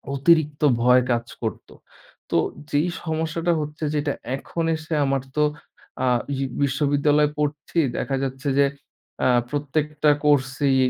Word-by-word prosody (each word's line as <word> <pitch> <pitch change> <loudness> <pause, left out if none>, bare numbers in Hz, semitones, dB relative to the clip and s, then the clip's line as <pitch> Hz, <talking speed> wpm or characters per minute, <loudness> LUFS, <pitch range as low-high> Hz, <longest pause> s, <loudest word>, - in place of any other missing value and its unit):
অতিরিক্ত 150 +1 +3 0.2
ভয় 125 +1 +6
কাজ 120 0 0 0.2
করত। 110 - -4 0.6
তো - - +2 0.3
যেই 150 +4 +1 0.2
সমস্যাটা 160 +1 -1
হচ্ছে 150 +1 -6
যেটা, 145 -1 0 0.2
এখন 165 +4 -4
এসে 160 +1 -6
আমার 135 -1 0 0.2
তো 150 - +4 0.6
আ - - +2 0.3
বি 135 - -2 0.2
বিশ্ববিদ্যালয়ে 145 +2 +2
পড়ছি। 150 +3 -1 0.2
দেখা 135 - -1
যাচ্ছে 135 +2 -3
যে, 140 - +6 0.6
আ - - +5 0.2
প্রত্যেকটা 150 +1 0
কোর্সই 135 -1 +2
145 Hz, 125 wpm, -23 LUFS, 135-155 Hz, 0.6 s, ভয়